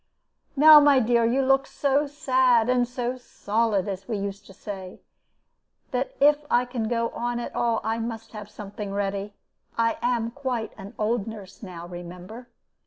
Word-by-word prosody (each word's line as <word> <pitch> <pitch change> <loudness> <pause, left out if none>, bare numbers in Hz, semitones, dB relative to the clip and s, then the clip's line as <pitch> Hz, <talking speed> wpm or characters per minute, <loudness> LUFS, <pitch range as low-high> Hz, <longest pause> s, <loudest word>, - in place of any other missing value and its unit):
"Now, 305 +2 +9
my 290 -2 +5
dear, 235 0 +2
you 255 +4 +2
look 270 +1 +3
so 285 +1 +1
sad 255 -5 +2
and 250 -1 +2
so 245 0 -3
'solid,' 215 -4 -1
as 195 -1 -5
we 225 -3 -2
used 200 0 -5
to - - -13
say, 190 -2 -8 0.9
that 255 +1 -2
if 295 +1 +4
I 245 +1 +3
can 245 -3 -3
go 230 0 0
on 240 0 -3
at 240 - -6
all, 230 -1 +1
I 225 +2 -1
must 225 -1 -5
have 210 -2 -9
something 205 -1 -7
ready. 200 0 -3 0.4
I 230 0 +1
am 235 -2 0
quite 250 -4 -3
an 195 -1 -11
old 220 0 0
nurse 205 -4 -10
now, 175 -5 -8
remember. 180 +7 -9
230 Hz, 170 wpm, -25 LUFS, 205-250 Hz, 0.9 s, Now